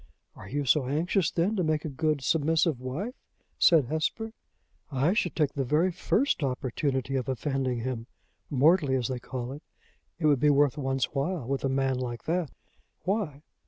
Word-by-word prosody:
"Are 95 - -11
you 145 +2 -2
so 135 0 +3
anxious, 165 +5 +1
then, 180 +6 0
to 185 - +1
make 155 -1 0
a - - -1
good, 150 0 0
submissive 160 0 +2
wife?" 155 - -4 0.5
said 160 -6 +6
Hesper. 160 - -2 0.6
"I 140 +6 +2
should 195 -5 0
take 150 -4 +1
the 140 - -1
very 155 +8 +2
first 215 - +1
opportunity 135 0 -1
of 130 -1 -1
offending 130 -2 -1
him 120 -2 -4 0.4
mortally, 145 0 +4
as 125 -1 -1
they 130 -1 -2
call 125 0 -5
it. 145 +2 -8 0.6
It 165 - -2
would 145 -3 +4
be 150 - +4
worth 145 -1 +4
one's 135 -3 0
while 145 -1 -1
with 135 0 -2
a 135 - +1
man 135 -1 +1
like 120 -2 -4
that." 170 -2 -1 0.5
"Why? 180 -8 -2
145 Hz, 175 wpm, -28 LUFS, 130-160 Hz, 0.6 s, said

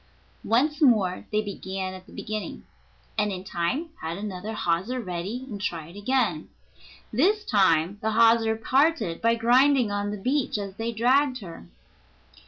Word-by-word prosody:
Once 290 +7 +1
more 210 -10 +3
they 215 0 +1
began 190 -2 -5
at 185 +1 -11
the - - -16
beginning, 215 -4 -5 0.6
and 210 0 +1
in 185 -1 -5
time 195 - -2
had 165 +2 -4
another 205 +1 -5
hawser 190 +6 -1
ready, 195 +5 -4
and 205 -6 -7
tried 170 -3 -4
again. 205 -7 0 0.6
This 405 - +2
time 190 -2 +2
the 220 0 -1
hawser 225 0 +4
parted 265 - +1
by 230 0 +3
grinding 245 +1 +4
on 205 0 -1
the 210 - -4
beach 255 +4 0
as 200 -2 -5
they 230 +1 -2
dragged 255 +3 +2
her. 165 - -10
215 Hz, 150 wpm, -26 LUFS, 190-250 Hz, 0.6 s, hawser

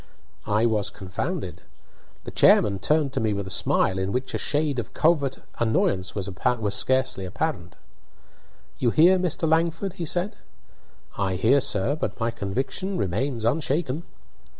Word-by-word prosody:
I 105 +2 +2
was 110 -3 +1
confounded. 95 - -5 0.6
The - - -7
chairman 100 -2 +4
turned 145 +6 +1
to 135 - 0
me 110 -3 0
with 100 -1 -3
a 95 - -8
smile, 95 +1 +1
in 95 +1 -1
which 130 +3 -2
a - - -1
shade 145 -3 0
of 120 +2 -7
covert 150 -5 +2 0.2
annoyance 100 -5 +1
was 100 -3 -3 0.5
scarcely 130 -1 +1
apparent. 90 - -3 1.0
"You 120 - +2
hear, 175 +8 +5
Mr. 175 -2 0
Langford?" 165 +4 +1
he 175 -3 -5
said. 180 +6 -2 0.8
"I 95 -2 0
hear, 120 +9 +3
sir; 105 +4 +1
but 155 - -4
my 115 0 0
conviction 130 - -3
remains 115 - -1
unshaken." 145 +2 0
130 Hz, 145 wpm, -25 LUFS, 100-155 Hz, 1.0 s, hear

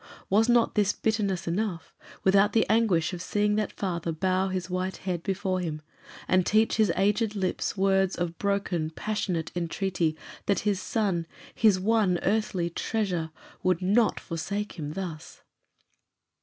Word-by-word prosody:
Was 220 +4 +4
not 240 -1 +4
this 205 -2 +2
bitterness 205 -5 -1
enough, 175 -1 -2 0.3
without 200 +2 +4
the 225 - +4
anguish 200 -7 +2
of 175 - -5
seeing 205 +2 +1
that 215 -2 -1
father 170 -4 -3
bow 185 +3 +1
his 185 -1 -3
white 185 +1 -2
head 180 -3 -3
before 190 -1 -1
him, 155 -4 -4 0.4
and 185 0 +4
teach 215 +4 +2
his 215 -2 +4
aged 210 +3 +1
lips 190 +1 -2
words 190 -1 +2
of 170 -1 -3
broken, 195 -5 0
passionate 180 -2 -2
entreaty 170 -2 -1 0.3
that 200 - +2
his 205 -3 0
son 190 -8 -1 0.3
his 210 -5 +4
one 205 -2 +2
earthly 190 -4 0
treasure 180 -5 -1 0.3
would 185 -1 +1
not 210 +5 +3
forsake 200 +5 -4
him 150 0 -4
thus? 170 -4 -7
190 Hz, 145 wpm, -27 LUFS, 175-210 Hz, 0.4 s, Was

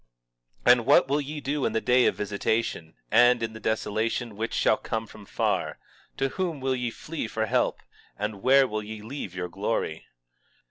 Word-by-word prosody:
20:3 - - +8
And 120 -2 +4
what 140 - +6
will 145 +2 +1
ye 150 +2 -5
do 145 0 -2
in - - 0
the 110 - +2
day 125 +2 +4
of - - +1
visitation, 100 -4 -2 0.2
and 120 -1 +5
in 110 -1 -3
the 110 - -9
desolation 110 +1 -1
which 115 +2 -3
shall - - +4
come 115 0 -3
from 105 -2 -14
far? - - -1 0.4
to 135 - +1
whom 175 -2 -3
will 130 0 0
ye 125 -1 -1
flee 155 +2 -5
for 110 0 -1
help? - - +1 0.4
and 105 -1 -4
where 135 +2 +5
will 110 -1 -3
ye 105 0 -8
leave 110 -6 -6
your 90 0 -3
glory? 95 -3 -3
115 Hz, 190 wpm, -26 LUFS, 105-130 Hz, 0.4 s, 20:3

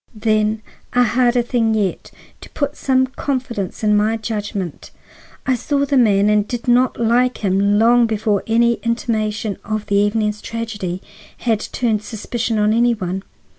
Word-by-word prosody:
"Then, 215 0 0 0.3
a 245 0 +4
harder 245 +1 +2
thing 230 -2 +1
yet,—to 200 -4 -5
put 285 -1 -1
some 260 -1 +2
confidence 255 -7 -4
in 210 -1 +3
my 215 +2 +2
judgment. 210 -5 -5 0.6
I 265 - +2
saw 280 +3 0
the 280 0 0
man 205 -5 +4
and 210 0 +2
did 240 -1 -5
not 245 0 +3
like 240 0 +1
him 200 +2 +2
long 235 +2 +5
before 215 -2 0
any 235 +1 +2
intimation 220 -3 -2
of 215 0 -3
the 200 - -1
evening's 210 +1 +1
tragedy 205 -6 -5 0.3
had 225 -3 0
turned 220 -2 -1
suspicion 225 +1 -3
on 210 0 +3
any 235 +1 +3
one. 190 -2 -4
220 Hz, 150 wpm, -19 LUFS, 210-240 Hz, 0.6 s, long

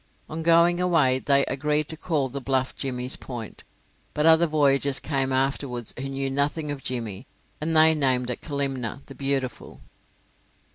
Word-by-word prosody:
On 160 +1 -5
going 170 +2 +4
away 155 -8 +3
they 140 0 +3
agreed 150 +2 0
to 160 - -1
call 155 -4 -1
the 135 +2 -6
bluff 130 0 -1
Jimmy's 125 -1 -1
point, 120 -4 -8 0.5
but 150 - +1
other 165 +1 +6
voyagers 140 -3 +2
came 135 -3 -1
afterwards 130 -3 -1
who 135 +2 -5
knew 135 0 -3
nothing 145 +2 -1
of 140 -2 -6
Jimmy, 115 -3 -5 0.3
and 160 +1 -1
they 160 0 +6
named 130 -4 +1
it 125 - -6
Kalimna, 135 -4 -3
The 135 - -11
Beautiful. 135 -2 -3
140 Hz, 155 wpm, -25 LUFS, 130-155 Hz, 0.5 s, other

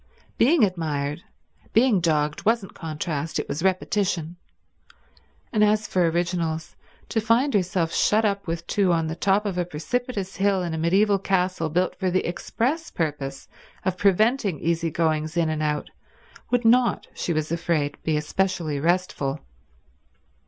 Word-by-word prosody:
Being 275 +2 +5
admired, 155 -5 -1 0.5
being 230 -3 +4
dogged, 150 -2 0
wasn't 220 -2 +1
contrast, 160 -1 -4
it - - -2
was 150 - -3
repetition; 185 -2 0 1.2
and 215 -1 +4
as 210 +1 +3
for 180 -2 +2
originals, 165 -2 -2 0.3
to 225 - 0
find 235 +6 +2
herself 180 -4 0
shut 220 +1 +3
up 200 -2 -1
with 165 0 -3
two 195 -3 +2
on 165 -1 +1
the 160 0 -3
top 195 +4 +2
of 190 -3 -2
a - - +2
precipitous 195 +5 -3
hill 195 -1 +2
in 170 -2 -3
a - - -2
medieval 195 +5 +3
castle 185 -4 0
built 180 +4 0
for 190 -1 +1
the 185 +1 0
express 260 - -2
purpose 145 -4 -3 0.4
of 185 -2 +1
preventing 200 - +2
easy 165 0 0
goings 155 0 -1
out - - +4
and 155 -1 -1
in, 150 -1 0 0.7
would 245 -1 +1
not, 240 +1 +4
she - - -3
was 155 -1 -1
afraid, 160 -4 0
be 155 -1 0
especially 160 -1 -1
restful. 165 -4 0
175 Hz, 150 wpm, -24 LUFS, 160-205 Hz, 1.2 s, Being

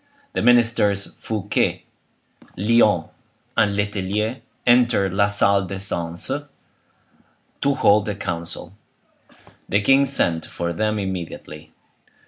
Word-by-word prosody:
The - - -1
ministers 115 -5 +3
Fouquet, 105 -2 -1 0.7
Lyonne, 105 -4 +3 0.5
and 100 -1 +2
Letellier 105 +4 -2 0.2
entered 120 -6 +3
la 100 +1 +3
salle 100 -1 +3
des 95 - -5
seances, 85 -3 -3 1.3
to 140 0 +2
hold 105 -4 +3
a 105 - -2
council. 85 -2 -6 1.0
The 100 - +3
king 135 +6 +4
sent 85 - 0
for 85 0 -4
them 110 +5 -1
immediately. 85 -5 -6
100 Hz, 105 wpm, -22 LUFS, 90-110 Hz, 1.3 s, king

